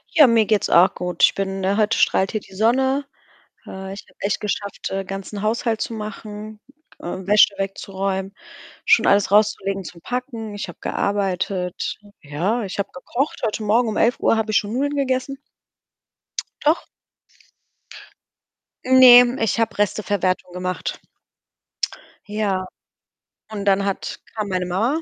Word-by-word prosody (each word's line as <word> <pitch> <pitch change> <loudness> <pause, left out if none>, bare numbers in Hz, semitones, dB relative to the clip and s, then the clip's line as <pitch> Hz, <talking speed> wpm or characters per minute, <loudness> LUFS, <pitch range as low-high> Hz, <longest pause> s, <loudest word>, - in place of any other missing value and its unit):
Ja, 305 - +9
mir 230 -2 +4
geht's 210 -2 +1
auch 175 +2 +5
gut. 180 0 -3
Ich - - +6
bin 195 0 -2
ne, 195 +2 +1
heute 220 +1 +2
strahlt 190 - +2
hier 215 - -1
die 195 - -17
Sonne. 265 +6 +2 0.6
Äh, 190 0 -7
ich 200 - -9
habe - - -26
echt 200 0 0
geschafft, 205 -1 -4
äh, 195 0 -2
ganzen 195 +2 -6
Haushalt 225 +1 0
zu 230 - -3
machen, 215 0 -7 0.4
äh, - - -18
Wäsche 200 +4 +3
wegzuräumen, 195 0 -3 0.5
schon - - +5
alles 200 -1 +3
rauszulegen, 195 -2 +2
zum 170 0 -10
Packen, 235 -2 -5
ich 200 - -5
habe 175 - -10
gearbeitet. 190 -2 -2 0.2
Ja, 175 +11 -1
ich 195 0 -6
habe 200 0 -1
gekocht. 245 +10 -3
Heute 220 0 -2
Morgen 225 +3 +2
um 215 - -3
11:00 235 -1 +2
habe 220 -1 -1
ich 215 - +4
schon 210 -1 -1
Nudeln 285 +3 -1
gegessen. 270 0 -1 1.3
Doch. 310 +3 +2 2.0
Ne, 250 -1 +8
ich 225 +1 0
habe 225 - 0
Resteverwertung 195 -3 0
gemacht. 180 0 -4 1.3
Ja, 205 -3 -1 0.9
und 205 -2 -5
dann 195 0 +3
hat 195 -1 -3 0.2
kam 215 -2 -2
meine 185 -1 -1
Mama 225 - 0
205 Hz, 145 wpm, -21 LUFS, 195-225 Hz, 2.0 s, Ja